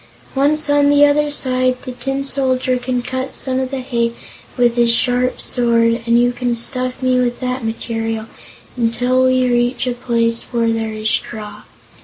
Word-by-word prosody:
Once 290 +3 +2
on 290 0 +3
the 290 0 +6
other 295 +1 +2
side, 255 -3 +1
the 255 - -6
Tin 270 +3 -3
Soldier 255 -2 0
can 245 0 -2
cut 260 +1 -3
some 260 -1 -3
of 260 -1 -2
the 270 -1 -4
hay 235 -2 -1 0.4
with 240 -1 +3
his 240 -1 +3
sharp 250 +1 +1
sword, 230 -1 +2
and 235 0 +4
you 245 0 +3
can 245 -1 -2
stuff 255 +2 -2
me 255 0 +2
with 245 -1 -1
that 255 -1 -3
material 225 0 -3 0.5
until 245 +2 +1
we 255 0 +2
reach 240 +1 +1
a 250 - -1
place 230 -1 0
where 230 -2 +1
there 225 -1 -2
is 215 0 -4
straw. 215 -1 -3
250 Hz, 175 wpm, -17 LUFS, 235-260 Hz, 0.5 s, the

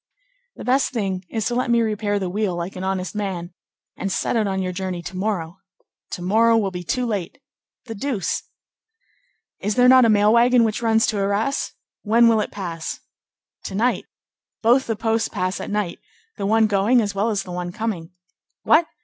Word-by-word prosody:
"The - - -9
best 265 +2 +1
thing 195 -5 -2
is 220 -3 -2
to 240 - 0
let 250 +1 0
me 235 0 +4
repair 210 -2 0
the 190 -2 -2
wheel 195 0 -1
like 175 +2 -5
an 185 - -5
honest 190 -2 -2
man, 190 -4 -4 0.4
and 195 - -3
set - - -1
out 220 -3 +2
on 190 -1 -1
your 185 -1 -2
journey 180 -1 -4
to 185 - -7
morrow." 185 -3 -2 0.6
"To 175 - -5
morrow 225 +5 +4
will 200 -3 0
be 180 -1 -6
too 250 +8 -1
late." 205 -4 -3 0.5
"The 225 - -6
deuce!" 225 -2 -2 1.2
"Is 210 +1 -1
there 250 0 +5
not 255 -1 +7
a - - +4
mail 210 0 +4
wagon 240 +1 +5
which 220 0 -1
runs 225 -1 +3
to 215 - -1
Arras? 200 +7 0 0.3
When 230 +2 +4
will 225 -2 +4
it - - -3
pass?" 170 -5 -5 0.7
"To 190 - -5
night. 240 +5 +1 0.6
Both 245 +4 +4
the 225 - 0
posts 225 +1 0
pass 185 -2 -2
at - - -6
night; 205 -4 -2 0.4
the 195 - -3
one 220 +1 +4
going 210 +4 +3
as 205 -3 -1
well 200 +3 0
as 205 -3 -1
the 180 - -9
one 175 0 -4
coming." 190 -5 -4 0.5
"What! 320 +1 +4
210 Hz, 195 wpm, -22 LUFS, 190-230 Hz, 1.2 s, not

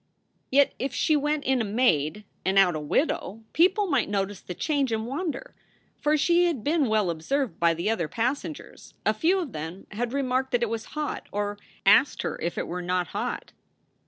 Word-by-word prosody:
Yet 280 +1 +4
if 260 0 -2
she 310 - +3
went 295 0 0
in 260 -2 +2
a - - +1
maid 205 - +1 0.2
and 190 +1 +1
out 185 -4 +5
a - - -2
widow, 210 - -1
people 375 +5 +4
might 280 - +1
notice 200 -1 -2
the 180 - -7
change 280 - 0
and 220 0 -1
wonder; 280 +2 -4 0.5
for 300 +1 +2
she 345 +3 +4
had 315 -11 -1
been 300 -2 +2
well 210 -5 +2
observed 210 - -2
by 170 -1 +3
the 170 +5 -3
other 175 -8 -1
passengers. 265 - -4
A - - +4
few 350 +4 +2
of 340 -9 -3
them 160 +4 -6
had 235 +3 -2
remarked 265 -1 0
that 240 -1 +2
it 235 - 0
was 225 -1 -3
hot, 300 -1 -3
or 205 0 -2 0.3
asked 230 +8 +5
her - - -4
if 170 +1 -2
it - - -1
were 180 +1 -4
not 180 -1 -1
hot. - - -4
235 Hz, 195 wpm, -26 LUFS, 195-285 Hz, 0.5 s, out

